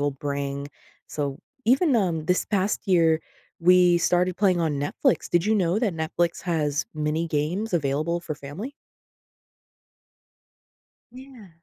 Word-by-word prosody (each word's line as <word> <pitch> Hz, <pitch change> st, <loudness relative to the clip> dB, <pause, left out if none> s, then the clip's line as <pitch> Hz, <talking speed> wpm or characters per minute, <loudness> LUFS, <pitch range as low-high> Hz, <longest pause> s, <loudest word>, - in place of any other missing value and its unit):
will 145 Hz, 0 st, +1 dB, 0.2 s
bring. 140 Hz, 0 st, -3 dB, 0.4 s
So 140 Hz, -2 st, -3 dB, 0.3 s
even, 270 Hz, +5 st, +3 dB
um, 170 Hz, -7 st, 0 dB
this 180 Hz, +1 st, +1 dB
past 200 Hz, -1 st, -1 dB
year, 165 Hz, -3 st, +4 dB, 0.4 s
we 180 Hz, 0 st, +5 dB
started 180 Hz, +1 st, +1 dB
playing 185 Hz, -4 st, +2 dB
on 160 Hz, -3 st, 0 dB
Netflix. 145 Hz, -, 0 dB
Did 175 Hz, +2 st, +2 dB
you 220 Hz, -, +3 dB
know 185 Hz, -1 st, +1 dB
that 220 Hz, -6 st, 0 dB
Netflix 165 Hz, +2 st, -1 dB
has 155 Hz, -4 st, 0 dB
mini 155 Hz, +2 st, -1 dB
games 165 Hz, +9 st, -2 dB
available 155 Hz, +3 st, 0 dB
for 160 Hz, -3 st, -5 dB
family? 145 Hz, -, -7 dB, 2.4 s
Yeah. 255 Hz, -6 st, -13 dB
170 Hz, 130 wpm, -25 LUFS, 150-190 Hz, 2.4 s, we